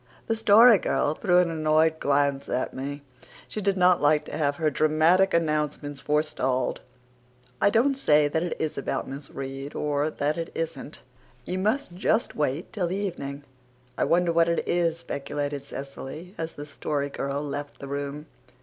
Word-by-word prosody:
The 225 - 0
Story 225 0 +7
Girl 145 - 0
threw 180 +2 +2
an 180 -2 +3
annoyed 160 0 +2
glance 140 -1 +1
at 125 - -1
me. 140 +2 -5 0.4
She 215 - -5
did 195 -1 +1
not 180 -1 +4
like 150 +1 +3
to - - -7
have 145 -2 +1
her 155 0 0
dramatic 155 +6 +3
announcements 150 -3 -1
forestalled. 140 -4 0 0.8
"I 200 - +5
don't 235 +6 +3
say 150 - +3
that 160 +2 -1
it 175 - -2
is 155 -3 -2
about - - -3
Miss 135 +1 -8
Reade 135 +1 -6
or 145 0 0
that 150 +1 -1
it 165 - -4
isn't. 160 -3 -5 0.4
You 185 - -2
must 215 +1 0
just 220 +5 0
wait 150 +3 -2
till 190 -5 -1
the 180 - -2
evening." 145 -8 -4 0.5
"I - - +1
wonder 175 0 +2
what 165 0 +4
it 170 - -1
is," 170 -2 +1
speculated 145 -2 -4
Cecily, 140 +6 -8
as 165 0 -5
the 145 - -8
Story 145 -1 -3
Girl 140 +1 -3
left 145 0 -5
the 140 - -8
room. 140 +1 -4
155 Hz, 170 wpm, -26 LUFS, 145-175 Hz, 0.8 s, Story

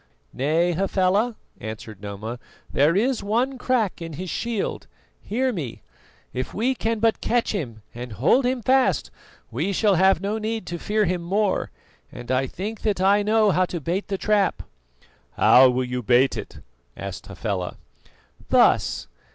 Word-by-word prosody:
"Nay, 160 +6 +1
Hafela," 195 +5 +1 0.2
answered 110 -1 -8
Noma, 105 +4 -6 0.3
"there 150 +5 +4
is 240 +5 +1
one 245 +6 0
crack 235 -9 0
in 165 -1 -6
his 180 +4 -5
shield. 235 -4 -3 0.3
Hear 255 +4 -1
me: 145 - -6 0.5
if 130 0 -4
we 245 +6 +1
can 230 -2 -1
but 225 +1 +1
catch 240 0 +1
him 120 - -5
and 120 -1 -7
hold 140 - +3
him 250 -1 -1
fast 260 +2 +2 0.4
we 200 - -1
shall 205 +1 +3
have 190 0 +4
no 205 +4 -2
need 220 +1 -3
to 170 0 -5
fear 210 +3 +1
him 180 -1 -1
more, 195 +3 0 0.4
and 120 0 -7
I 130 +1 +1
think 205 - -6
that 210 -4 0
I 200 +2 +4
know 215 0 +3
how 185 0 +3
to 175 -1 -5
bait 175 +6 -2
the 195 - -2
trap." 205 -1 +1 0.7
"How 130 +1 +7
will 125 +1 0
you 125 0 -3
bait 125 +3 +3
it?" - - -8 0.4
asked 100 -2 -7
Hafela. 100 -2 -4 0.7
"Thus. - - +3
190 Hz, 160 wpm, -24 LUFS, -, 0.7 s, How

